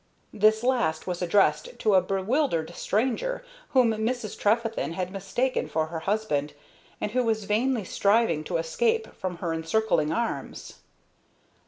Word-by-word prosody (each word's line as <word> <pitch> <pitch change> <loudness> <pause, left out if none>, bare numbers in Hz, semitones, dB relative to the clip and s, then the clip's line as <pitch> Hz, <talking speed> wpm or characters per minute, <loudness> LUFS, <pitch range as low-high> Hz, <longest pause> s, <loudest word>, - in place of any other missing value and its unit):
This 215 +1 +3
last 240 -11 +1
was 180 -1 -3
addressed 205 - +2
to 215 - +2
a 190 - +6
bewildered 190 - 0
stranger 265 - -1 0.2
whom 255 -3 +4
Mrs. 220 0 -2
Trefethen 225 -4 0
had 185 +1 -3
mistaken 200 +7 -1
for 160 0 0
her 165 +1 -5
husband, 160 -6 -1 0.5
and 210 - -2
who 255 +2 +1
was 220 -2 0
vainly 225 +3 +1
striving 200 -4 +2
to 170 - -1
escape 450 - 0
from 185 -3 -4
her 170 -1 -2
encircling 165 -1 +1
arms. 235 0 -4
210 Hz, 140 wpm, -26 LUFS, 175-235 Hz, 0.5 s, a